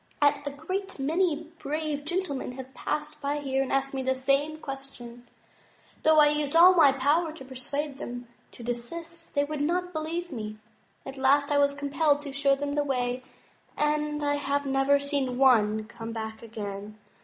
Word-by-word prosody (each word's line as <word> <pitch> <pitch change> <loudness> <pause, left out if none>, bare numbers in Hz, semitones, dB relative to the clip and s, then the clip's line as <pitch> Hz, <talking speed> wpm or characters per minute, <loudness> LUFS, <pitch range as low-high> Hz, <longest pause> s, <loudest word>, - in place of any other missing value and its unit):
A 290 -1 +5 0.2
great 370 +7 -4
many 320 +2 0
brave 300 0 -3
gentlemen 315 -7 -2
have 265 0 -9
passed 300 +1 -3
by 285 +1 -1
here 270 -2 0
and 270 - -2
asked 270 0 0
me 265 - -2
the 260 0 +1
same 275 +4 +1
question. 270 -4 -8 0.7
Though 315 0 +5
I 300 -1 +7
used 295 0 -1
all 355 +3 +9
my 315 -6 +7
power 295 +5 +2
to 270 -5 -11
persuade 275 +2 -4
them 245 0 -6 0.3
to 240 - -10
desist, 330 +9 -5
they 285 - +3
would 295 0 -3
not 360 +4 0
believe 330 +2 -3
me. 215 -4 -5 0.5
At 270 0 -7
last 285 +2 +3
I 290 - +4
was 280 0 +3
compelled 285 +1 +1
to 280 -2 -6
show 275 0 +3
them 285 +1 -3
the 290 0 +1
way, 250 -2 -1 0.6
and 300 0 0
I 290 0 +1
have 285 0 -1
never 270 +1 +3
seen 280 -3 -1
one 220 -5 +4
come 230 +1 -8
back 220 -1 -5
again. 210 -2 -7
280 Hz, 175 wpm, -28 LUFS, 260-300 Hz, 0.7 s, all